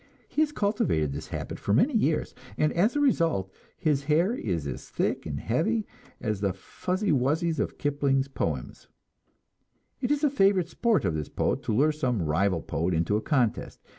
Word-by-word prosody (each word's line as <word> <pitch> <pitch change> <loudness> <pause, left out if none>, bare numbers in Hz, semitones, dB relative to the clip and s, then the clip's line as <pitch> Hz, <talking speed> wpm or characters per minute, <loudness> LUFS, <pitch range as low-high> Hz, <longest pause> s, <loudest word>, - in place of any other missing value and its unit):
He 305 - 0
has 305 -1 +2
cultivated 200 - 0
this 75 +2 -6
habit - - -5
for 100 - +1
many 260 - +3
years, 165 -9 +1 0.2
and 150 - +2
as 205 +10 +2
a - - +2
result 165 - +1 0.2
his 145 -3 0
hair 165 +8 +3
is 90 - -2
as 70 -3 -6
thick - - -1
and 70 -2 -3
heavy 205 - 0 0.3
as 105 -4 -2
the 100 -2 +1
"fuzzy 185 - -2
wuzzies" 155 +5 +1
of - - -2
Kipling's 140 -2 +1
poem. 75 - -3 1.3
It 245 - 0
is 295 +1 +1
a 295 - +4
favorite 195 -8 +3
sport 220 - +1
of 85 - +1
this 75 -2 -3
poet - - 0
to - - 0
lure 150 +6 +4
some 125 - -1
rival 85 +2 +1
poet 85 +2 -1
into 85 +6 +1
a 105 - +1
contest. 125 -6 0
145 Hz, 180 wpm, -27 LUFS, -, 1.3 s, a